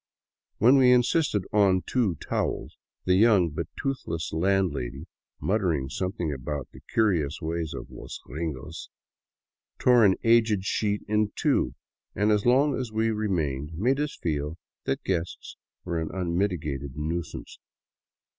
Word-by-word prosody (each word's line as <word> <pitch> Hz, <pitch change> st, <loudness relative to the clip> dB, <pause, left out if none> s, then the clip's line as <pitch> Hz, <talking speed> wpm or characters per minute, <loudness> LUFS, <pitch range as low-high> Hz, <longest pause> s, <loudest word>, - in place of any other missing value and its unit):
When 125 Hz, +5 st, +6 dB
we 130 Hz, -2 st, +6 dB
insisted 125 Hz, -, +3 dB
on 95 Hz, -3 st, +4 dB
two 115 Hz, -9 st, +1 dB
towels, -, -, -3 dB, 0.3 s
the 90 Hz, -, +3 dB
young 95 Hz, -4 st, +5 dB
but 75 Hz, -, -4 dB
toothless 85 Hz, -, -3 dB
landlady, 80 Hz, -7 st, 0 dB, 0.3 s
muttering 90 Hz, -10 st, 0 dB
something 90 Hz, -3 st, -2 dB
about 70 Hz, +1 st, -4 dB
the -, -, -14 dB
curious 85 Hz, -10 st, +1 dB
ways 80 Hz, 0 st, -3 dB
of -, -, -8 dB
los -, -, -8 dB
gringos, 80 Hz, -1 st, -6 dB, 0.9 s
tore 125 Hz, -2 st, +5 dB
an 95 Hz, -3 st, +5 dB
aged 115 Hz, -4 st, +4 dB
sheet 105 Hz, 0 st, 0 dB
in 105 Hz, 0 st, +1 dB
two, -, -, +1 dB, 0.4 s
and 105 Hz, +1 st, +2 dB
as 105 Hz, +1 st, +2 dB
long 135 Hz, +4 st, +4 dB
as 125 Hz, -4 st, -4 dB
we 110 Hz, +1 st, +1 dB
remained 80 Hz, -9 st, -1 dB
made 125 Hz, -, +1 dB
us 150 Hz, 0 st, -2 dB
feel 75 Hz, 0 st, -2 dB, 0.3 s
that -, -, -1 dB
guests 85 Hz, -2 st, -3 dB, 0.3 s
were 85 Hz, -1 st, -1 dB
an 80 Hz, -, -3 dB
unmitigated 85 Hz, -7 st, -2 dB
nuisance. 80 Hz, +1 st, -4 dB
95 Hz, 135 wpm, -27 LUFS, 80-110 Hz, 0.9 s, When